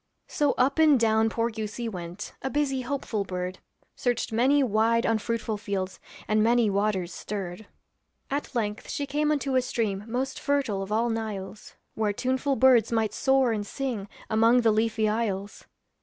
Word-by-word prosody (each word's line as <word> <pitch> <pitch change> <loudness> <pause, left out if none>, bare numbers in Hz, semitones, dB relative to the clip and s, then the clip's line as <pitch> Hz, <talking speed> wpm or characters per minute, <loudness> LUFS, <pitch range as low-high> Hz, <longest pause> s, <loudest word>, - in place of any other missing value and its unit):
So 295 -6 +1
up 270 +5 +1
and 305 -4 +6
down 220 0 +3
poor 230 +1 -1
goosey 220 +2 -4
went, 180 -1 -6
A 265 - -2
busy, 275 -2 0
hopeful 250 -5 -2
bird. 185 -1 -4 0.4
Searched 245 -1 -1
many 265 +6 +3
wide 230 0 +2
unfruitful 225 0 -1
fields, 195 -2 -4 0.3
And 215 0 +2
many 230 -1 +3
waters 195 -3 0
stirred. 195 0 -6 0.6
At 280 -1 -3
length 210 -3 -2
she 285 - -2
came 300 +2 0
unto 280 -3 0
a 255 - +4
stream 210 -5 -2
Most 260 +3 -2
fertile 275 -9 0
of 195 +1 -6
all 230 +2 +1
Niles, 210 -3 -5 0.2
Where 215 -2 0
tuneful 260 +4 0
birds 255 -4 +5
might 225 -2 +1
soar 265 -2 +3
and 215 -2 -1
sing 220 -3 -4 0.2
Among 230 +3 +4
the 225 -2 +4
leafy 220 0 +1
isles. 210 -2 -2
225 Hz, 160 wpm, -27 LUFS, 210-260 Hz, 0.6 s, and